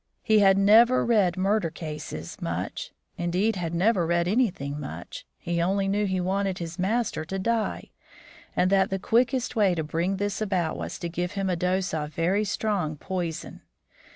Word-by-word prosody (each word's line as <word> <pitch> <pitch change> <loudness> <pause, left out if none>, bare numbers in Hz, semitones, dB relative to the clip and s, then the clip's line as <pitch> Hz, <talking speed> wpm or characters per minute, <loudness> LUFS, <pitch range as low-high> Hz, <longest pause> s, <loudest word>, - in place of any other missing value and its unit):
He 220 -2 +4
had 195 -1 +5
never 225 +5 +6
read 210 -7 +3
murder 195 -1 +1
cases 150 - -7
much; - - -4 0.3
indeed, 180 +6 +1
had 170 -2 -3
never 190 +1 +3
read 170 0 +1
anything 180 - 0
much; 140 - -8
he 170 0 -2
only 195 +3 +1
knew 205 +1 +1
he 190 -1 0
wanted 190 +1 -1
his 170 +1 -6
master 210 -2 0
to 190 +4 -4
die, 225 +3 -1 0.6
and 185 +1 +2
that 195 -1 +4
the 195 - -1
quickest 245 +5 +1
way 200 -5 +3
to 160 - -1
bring 170 +5 -1
this 205 +1 -2
about 185 -6 0
was - - -5
to 170 - -4
give 175 +2 -3
him 195 -2 -1
a - - +1
dose 180 +2 0
of 150 -2 -3
very 185 +5 +1
strong 195 -6 -1
poison. 170 0 -5
190 Hz, 175 wpm, -26 LUFS, 170-205 Hz, 0.6 s, never